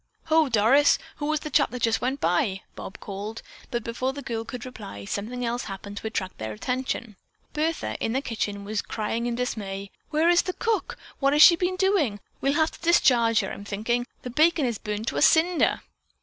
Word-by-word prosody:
"Ho, 315 -2 +4
Doris, 235 +6 +5 0.2
who 290 - -3
was 310 -1 0
the 305 - -6
chap - - +4
that 250 -1 -6
just 225 -1 +2
went 265 +3 -1
by?" 185 +2 +1
Bob 195 - -8
called—but 215 +3 -7
before 255 +3 -2
the 285 0 -7
girl 225 -1 -3
could 250 +1 -7
reply, 200 - -8
something 235 - -3
else 240 +1 -2
happened 200 +1 -7
to 220 - -4
attract 190 -4 -4
their 110 0 -4
attention. 240 - -3 0.4
Bertha, 320 +2 -1
in 225 - 0
the 265 - +2
kitchen, 205 -5 -3
was 210 0 -1
crying 225 +2 -3
in 240 - -1
dismay: 200 -5 -4 0.2
"Where 315 +2 +2
is 345 0 +5
the 365 - -4
cook? 450 +1 -1 0.2
What 275 0 +3
has 300 +1 +8
she 340 - +9
been 365 +1 -1
doing? 370 - +1 0.2
We'll 275 +1 +2
have 315 +1 +2
to - - -14
discharge 240 -10 +4
her. - - -4
I'm - - -7
thinking. 225 +4 -1 0.2
The 250 - -5
bacon 310 +2 +3
is 235 -4 -2
burned 210 0 -4
to - - -5
a - - +1
cinder." 330 +3 +4
240 Hz, 205 wpm, -26 LUFS, 210-295 Hz, 0.4 s, she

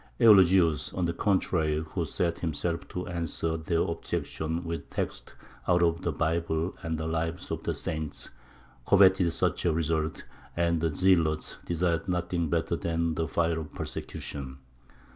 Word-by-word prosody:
Eulogius, 95 -7 +5
on 90 - 0
the 85 - 0
contrary, 80 -5 +1
who - - -1
set 85 -1 -1
himself 85 +1 -2
to 90 0 -5
answer 85 -2 -2
their 80 +1 0
objections 80 0 -3
with 85 0 -5
texts - - -4 0.3
out 90 -1 +4
of 85 +1 +2
the 85 - -1
Bible 80 +2 -1
and 80 -1 -2
the 80 - -3
Lives 80 +1 -2
of - - -2
the - - -1
Saints, 80 -1 -4 0.6
coveted 95 -3 +5
such - - 0
a 85 - +3
result, 80 0 -1 0.3
and 85 -1 +1
the 80 - +2
zealots 80 -1 +2
desired 85 -1 0
nothing 90 -2 -1
better 85 +2 0
than 85 0 -1
the 80 +1 -1
fire 80 +3 0
of 80 -1 -8
persecution. 65 -2 -5
85 Hz, 150 wpm, -28 LUFS, 80-85 Hz, 0.6 s, Eulogius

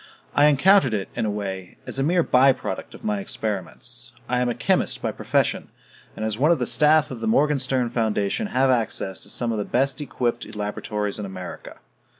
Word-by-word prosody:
I 145 - +5
encountered 150 - +5
it, 100 -2 -3
in 115 -2 -1
a - - 0
way, 95 -3 -5
as - - -3
a - - +2
mere 170 +3 +3
by 130 0 +5
product - - -6
of - - -14
my 105 -1 0
experiments; 100 -2 -5 0.2
I 125 0 0
am 125 0 +1
a 120 - -2
chemist - - +1
by - - -2
profession, - - 0 0.5
and 110 - -3
as 110 0 -2
one 150 +4 +4
of 170 - +4
the 125 - -1
staff 150 +1 +3
of 125 - -6
the 115 - -3
Morganstern 130 -1 +2
Foundation 110 - 0
have 130 -6 +2
access 110 -5 0
to - - -8
some 120 -1 -1
of 110 - -2
the - - 0
best 135 +6 0
equipped 120 -5 -2
laboratories 105 0 -3
in 105 - -4
America. 95 -1 -8
120 Hz, 200 wpm, -24 LUFS, 105-135 Hz, 0.5 s, I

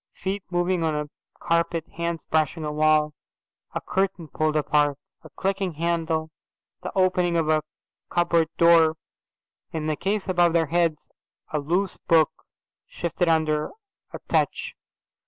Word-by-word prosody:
Feet 195 +2 -3
moving 175 0 +1
on 160 -2 0
a 150 0 -3 0.3
carpet, 170 -1 0
hands 170 0 -3
brushing 160 0 0
a 150 - -2
wall, 155 0 +3 0.6
a - - -1
curtain 190 -4 -1
pulled 155 +1 0
apart, 150 -1 +2 0.3
a - - -12
clicking 195 -1 -2
handle, 160 -1 -1 0.5
the 180 - -5
opening 180 -2 +2
of 160 -2 +1
a 155 -1 +3 0.5
cupboard 170 -2 +2
door. 165 -2 +6 0.8
In 160 -1 -3
the 155 -1 0
case 200 +5 -2
above 175 -2 +3
their 165 -1 +3
heads 165 0 0 0.4
a 150 - +1
loose 175 +6 0
book 160 -3 +3 0.6
shifted 170 0 -1
under 155 -2 +1 0.4
a - - -6
touch. - - 0
165 Hz, 135 wpm, -25 LUFS, 155-175 Hz, 0.8 s, door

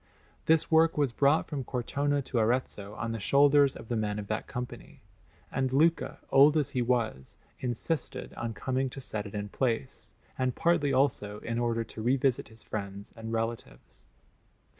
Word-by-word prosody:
This 160 0 +3
work 160 0 +4
was 145 -4 +2
brought 140 +6 +3
from 145 -4 -4
Cortona 140 +3 -1
to 125 -2 -1
Arezzo 110 -3 -1
on 115 +1 -3
the 115 - -3
shoulders 140 +4 +4
of - - -10
the 120 - -1
men 105 -2 -1
of 105 - -4
that 110 - -2
Company; 125 0 -7 0.5
and 130 -1 0
Luca, 160 +5 +2
old 145 +3 +7
as 145 -2 0
he 130 -4 0
was, 115 - -1 0.2
insisted 125 +4 -2
on 115 -1 -4
coming 130 0 -1
to 135 - -8
set 110 -5 -4
it 100 - -10
in 105 0 -3
place, 125 +2 -2 0.2
and 130 -1 0
partly 165 -4 +2
also 130 -6 +1
in 115 0 -2
order 115 -1 0
to 110 - -9
revisit 130 +2 +1
his 110 -1 -12
friends 100 -1 -6
and 115 0 -7
relatives. 115 - -5
125 Hz, 170 wpm, -29 LUFS, 110-140 Hz, 0.5 s, old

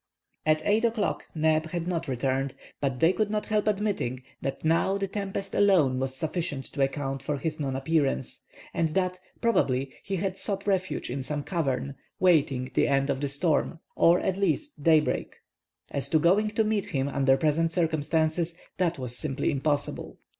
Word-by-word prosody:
At 155 0 +3
8 215 +3 +3
o'clock 225 -3 0
Neb 155 0 +2
had 175 -1 -3
not 170 -2 -2
returned; 135 +1 -1 0.2
but 135 -3 -1
they 165 +3 +5
could 215 0 0
not 210 0 -1
help 215 -1 0
admitting 200 - -1 0.2
that 135 +3 -4
now 165 +5 +3
the 200 0 -1
tempest 195 0 -4
alone 165 -11 +4
was 130 0 -2
sufficient 155 -2 -3
to 140 - -2
account 135 -1 -1
for 145 +1 -2
his 155 +3 -3
non 135 -3 -2
appearance, 135 - 0 0.3
and 165 - +1
that, 185 -1 0 0.2
probably, 135 - +1
he 195 - -3
had 190 +1 -2
sought 200 -2 -2
refuge 185 -9 -1
in 135 +2 -2
some 145 +2 -3
cavern, 140 -6 -1 0.3
waiting 140 -8 +3
the - - +3
end 140 0 +2
of 135 0 -3
the 145 - -1
storm, 160 +3 0 0.2
or, 170 +2 +5
at 190 - -1
least, 200 - -1
daybreak. 155 0 +2 0.6
As 140 - -1
to 160 - +4
going 190 +7 +3
to 215 +1 +1
meet 215 -2 0
him 135 -1 -1
under 135 -1 +3
present 160 +2 +1
circumstances, 160 0 0 0.2
that 175 -2 +1
was 125 -2 -5
simply 140 0 -1
impossible. 145 +1 -2
160 Hz, 175 wpm, -27 LUFS, 135-190 Hz, 0.6 s, they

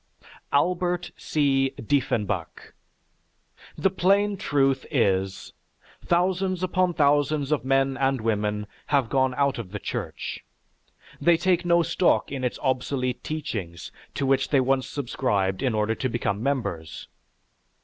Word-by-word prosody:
ALBERT 175 +3 +1
C. 135 -3 +1
DIEFFENBACH 105 - -1 1.1
The 195 - +2
plain 200 +2 +2
truth 135 -8 +1
is, 95 -7 0 0.5
thousands 185 +1 +1
upon 185 -1 +1
thousands 145 0 +2
of 150 - +1
men 135 0 +1
and 135 -1 +1
women 105 -1 -1 0.2
have 135 -5 +2
gone 130 -2 +2
out 140 -2 +1
of 110 -6 -6
the 105 - -4
Church. - - -5 0.8
They 170 -1 +5
take 180 0 +1
no 170 0 +4
stock 180 -3 +1
in 135 -2 -4
its 125 - -1
obsolete 130 -1 -1
teachings 105 - -5 0.2
to 140 - -1
which 135 0 +2
they 140 - +4
once 130 0 +1
subscribed 115 -8 -1
in 130 -5 0
order 105 +1 +1
to 130 +3 -2
become 105 -3 -2
members. 115 - -3
135 Hz, 130 wpm, -25 LUFS, 115-155 Hz, 1.1 s, They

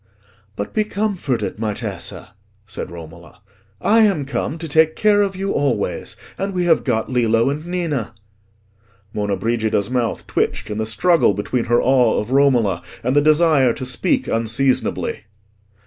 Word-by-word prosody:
"But 100 - -5
be 215 - +2
comforted, 195 - -2
my 105 -2 -2
Tessa," 100 -6 -5 0.3
said 100 +1 -6
Romola. 85 0 -12 0.4
"I 220 - +3
am 195 -10 +3
come 140 +3 -3
to 165 0 -6
take 160 +1 +3
care 210 -1 +3
of 195 -2 0
you 195 +1 -2
always. 140 -1 -1 0.2
And 195 0 -3
we 180 -1 0
have 165 -2 +3
got 115 -2 -1
Lillo 115 0 +2
and 150 +2 -5
Ninna." 160 - -2 1.0
Monna 105 -1 -1
Brigida's 110 0 -1
mouth 120 -3 -1
twitched - - -2
in 105 - -3
the 110 - -1
struggle 120 - +3
between 115 +4 -2
her 120 +1 +3
awe 125 -3 +3
of 105 +4 -5
Romola 125 -10 +3 0.2
and 125 +3 0
the 145 - +5
desire 155 -4 +4
to 130 - -5
speak 125 -1 0
unseasonably. 115 0 -1
125 Hz, 155 wpm, -20 LUFS, 110-160 Hz, 1.0 s, the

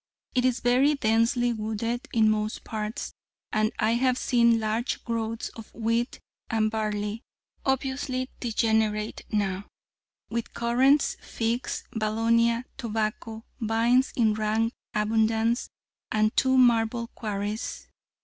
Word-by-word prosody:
It 250 -1 +2
is 255 -2 +1
very 260 +5 +4
densely 235 0 +2
wooded 225 +2 -3
in 220 -2 +4
most 215 0 0
parts, 215 0 -4 0.4
and 215 0 +1
I 215 - +2
have 250 +2 +2
seen 235 -2 +3
large 220 +3 -1
growths 230 -1 -2
of 225 -1 -12
wheat 230 +2 -1 0.3
and 215 -1 +1
barley, 210 0 -2 0.5
obviously 265 -1 -1
degenerate 220 -2 0
now, 200 -2 -1 0.6
with 235 0 -4
currants, 260 +5 +3
figs, 235 +2 -2
valonia, 230 +2 +2 0.2
tobacco, 220 -1 -3
vines 230 +3 +2
in 220 -3 +3
rank 220 +2 0 0.2
abundance, 220 +2 +1 0.4
and 215 0 +2
two 260 0 +3
marble 235 -1 +3
quarries. 210 0 -4
225 Hz, 110 wpm, -27 LUFS, 215-240 Hz, 0.6 s, very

